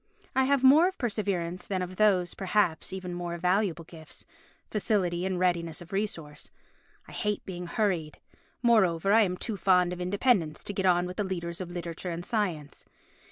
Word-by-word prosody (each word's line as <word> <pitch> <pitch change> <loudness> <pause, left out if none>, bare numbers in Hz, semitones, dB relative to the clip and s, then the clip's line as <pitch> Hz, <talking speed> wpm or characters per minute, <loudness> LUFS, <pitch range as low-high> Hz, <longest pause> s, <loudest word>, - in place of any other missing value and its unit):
I 265 0 +4
have 275 -1 +2
more 295 +7 +7
of 380 - -4
perseverance 190 -7 -2
than 190 -2 -1
of 180 0 -7
those, 190 -5 +3
perhaps, 190 -4 0
even 185 -1 -5
more 175 -1 -4
valuable 180 -1 +1
gifts—facility 175 +3 -3
and 190 -1 -1
readiness 170 -3 0
of 175 +2 -12
resource. 165 -7 -4 0.6
I - - -12
hate 210 -2 -2
being 180 -2 -6
hurried. 170 -7 -1 0.5
Moreover 195 -5 +3
I 225 - +7
am 180 -3 +1
too 220 0 -3
fond 180 -1 +3
of 180 - -6
independence 185 -3 +1
to 205 - -4
get 190 -1 0
on 175 -1 +3
with 180 +1 -7
the 210 - 0
leaders 175 -2 -4
of 180 - -5
literature 175 0 -5
and 170 +1 -5
science. 175 - -3
180 Hz, 170 wpm, -28 LUFS, 175-205 Hz, 0.6 s, more